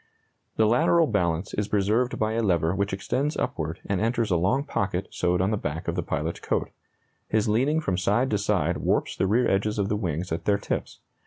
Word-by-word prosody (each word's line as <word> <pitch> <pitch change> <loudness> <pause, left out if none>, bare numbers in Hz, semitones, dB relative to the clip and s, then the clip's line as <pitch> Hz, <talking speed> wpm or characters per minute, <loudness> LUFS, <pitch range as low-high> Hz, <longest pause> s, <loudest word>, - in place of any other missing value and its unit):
] - - -48
The 110 - +4
lateral 125 +9 +4
balance 90 - -1
is 105 -1 -1
preserved 105 +5 +1
by 110 0 0
a 115 - 0
lever 85 -5 +2
which 100 +1 -1
extends 130 +9 -1
upward 80 +2 -3
and 100 -1 -1
enters 115 -1 0
a - - +4
long 95 +12 +2
pocket 100 -9 -2
sewed 90 0 +1
on 95 +3 +1
the 110 - +1
back 80 -3 -4
of - - 0
the - - -1
pilot's - - -3
coat. - - -2 0.6
His 110 0 +1
leaning 130 +9 +2
from 95 - -1
side 110 +8 +1
to 105 - +1
side 90 -5 +1
warps - - 0
the 95 - +1
rear 115 +6 +3
edges 105 +2 0
of 100 -1 0
the 105 - +1
wings 90 -4 -3
at 80 - -3
their 100 -1 +3
tips. 100 - -4
100 Hz, 220 wpm, -26 LUFS, 90-110 Hz, 0.6 s, The